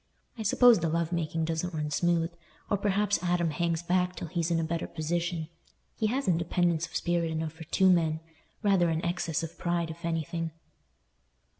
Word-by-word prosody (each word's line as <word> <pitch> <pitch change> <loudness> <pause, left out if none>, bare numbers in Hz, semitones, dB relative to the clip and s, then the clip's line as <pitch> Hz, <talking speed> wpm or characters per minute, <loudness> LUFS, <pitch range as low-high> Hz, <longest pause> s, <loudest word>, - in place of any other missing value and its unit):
I 230 - -6
suppose 230 +1 +6
the 165 -1 0
love 165 +1 0
making 165 -1 -1
doesn't 165 +2 -2
run 150 -1 -2
smooth, 170 +1 +1 0.4
or 205 - +3
perhaps 205 -1 +1
Adam 175 -2 +1
hangs 170 +1 -1
back 180 +1 +1
till 170 - -6
he's 170 -1 -1
in 170 -1 +2
a - - 0
better 165 +1 -2
position. 170 0 -2 0.5
He 220 - +1
has 260 +2 -1
independence 170 -1 +1
of - - -14
spirit 170 -1 +1
enough 160 -1 -3
for 160 0 -10
two 190 +4 +3
men—rather 170 +2 +1
an 160 +1 -1
excess 170 -2 -1
of 165 +1 -7
pride, 170 -2 0
if 170 +2 -11
anything." 165 0 -2
170 Hz, 175 wpm, -29 LUFS, 160-180 Hz, 0.5 s, suppose